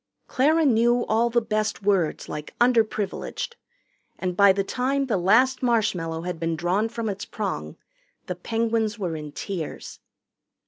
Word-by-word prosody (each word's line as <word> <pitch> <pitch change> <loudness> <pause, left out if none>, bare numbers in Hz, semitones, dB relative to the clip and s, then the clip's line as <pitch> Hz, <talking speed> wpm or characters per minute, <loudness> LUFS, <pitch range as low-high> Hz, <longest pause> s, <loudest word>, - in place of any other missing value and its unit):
Clara 310 +5 +2
knew 240 -1 +3
all 230 +2 +2
the 235 0 +1
best 215 -1 -1
words 195 -6 +1
like 150 0 -7
"underprivileged," 230 - 0 0.6
and 180 -1 -3
by 200 +1 +7
the 195 +1 0
time 265 +6 0
the 235 -6 0
last 225 +9 +3
marshmallow 185 -9 0
had 180 -2 -4
been 165 0 -1
drawn 180 +7 0
from 230 -1 -4
its 200 -1 -3
prong - - -4 0.5
the - - -3
Penguins 225 -1 -1
were 180 -6 -3
in 150 -1 -7
tears. 170 +1 -6
215 Hz, 145 wpm, -25 LUFS, 180-235 Hz, 0.6 s, by